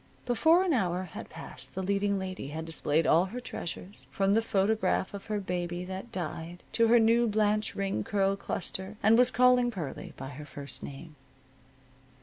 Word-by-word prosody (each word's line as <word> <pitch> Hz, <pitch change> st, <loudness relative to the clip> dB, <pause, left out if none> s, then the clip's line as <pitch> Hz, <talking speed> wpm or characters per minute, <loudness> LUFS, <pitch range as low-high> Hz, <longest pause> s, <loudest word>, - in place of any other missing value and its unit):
Before 320 Hz, +9 st, +4 dB
an 365 Hz, -4 st, +1 dB
hour 185 Hz, -6 st, +1 dB
had 180 Hz, -, -8 dB
passed, 165 Hz, -, -10 dB
the 190 Hz, -, -2 dB
leading 200 Hz, +1 st, +1 dB
lady 185 Hz, -5 st, -5 dB
had 160 Hz, +3 st, -5 dB
displayed 160 Hz, -1 st, +1 dB
all 165 Hz, +3 st, +5 dB
her 230 Hz, +6 st, -6 dB
treasures, 195 Hz, -4 st, -7 dB
from 195 Hz, 0 st, +1 dB
the 225 Hz, -, +4 dB
photograph 200 Hz, -2 st, +1 dB
of 200 Hz, -1 st, -7 dB
her 210 Hz, -1 st, -1 dB
baby 180 Hz, -2 st, -3 dB
that 190 Hz, +5 st, -7 dB
died 175 Hz, -2 st, -5 dB
to 230 Hz, -1 st, +3 dB
her 240 Hz, +2 st, +6 dB
new 230 Hz, +1 st, +4 dB
Blanche 215 Hz, 0 st, +1 dB
Ring 195 Hz, -, -1 dB
curl 195 Hz, -, +1 dB
cluster, 190 Hz, +1 st, -4 dB
and 220 Hz, +2 st, +6 dB
was 250 Hz, +1 st, +5 dB
calling 250 Hz, -1 st, +4 dB
Pearlie 170 Hz, -, -6 dB
by 135 Hz, 0 st, -6 dB
her 145 Hz, +1 st, -9 dB
first 140 Hz, -2 st, -5 dB
name. 150 Hz, +3 st, -9 dB
195 Hz, 175 wpm, -29 LUFS, 175-220 Hz, -, her